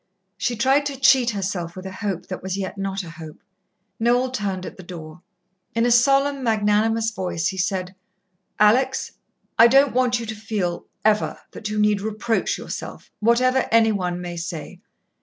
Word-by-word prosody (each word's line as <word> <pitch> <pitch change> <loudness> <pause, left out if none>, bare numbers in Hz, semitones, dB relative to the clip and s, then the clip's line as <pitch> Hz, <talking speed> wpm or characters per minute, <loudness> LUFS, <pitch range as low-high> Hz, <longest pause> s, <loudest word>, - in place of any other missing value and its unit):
She 245 - -1
tried 270 +5 +2
to 275 -2 -6
cheat 260 -2 +5
herself 190 -5 -3
with 185 0 -8
a 190 - -5
hope 190 -2 -4
that 185 - -6
was 190 +1 -3
yet 190 0 -4
not 195 -1 -3
a 165 - -9
hope. 160 -2 -11 0.6
Noel 245 +2 +2
turned 195 -6 -3
at - - -8
the - - -11
door. 170 -2 -10 0.5
In 230 +1 +2
a 245 - +2
solemn, 275 +3 +3
magnanimous 220 0 +2
voice 180 -4 -2
he 190 - -6
said: 185 -1 -1 0.7
"Alex! 255 +6 +3 0.5
I 230 - +10
don't 275 +3 +4
want 250 -1 +2
you 230 - -5
to 220 - -4
feel 205 -5 -3 0.2
ever 215 -1 +2
that 210 - -6
you 215 - -3
need 210 -1 +2
reproach 220 +2 -1
yourself, - - -7
whatever 250 +4 +3
any 225 -1 +5
one 180 -3 -2
may 175 -1 -6
say. 170 +1 -6
210 Hz, 175 wpm, -23 LUFS, 185-240 Hz, 0.7 s, I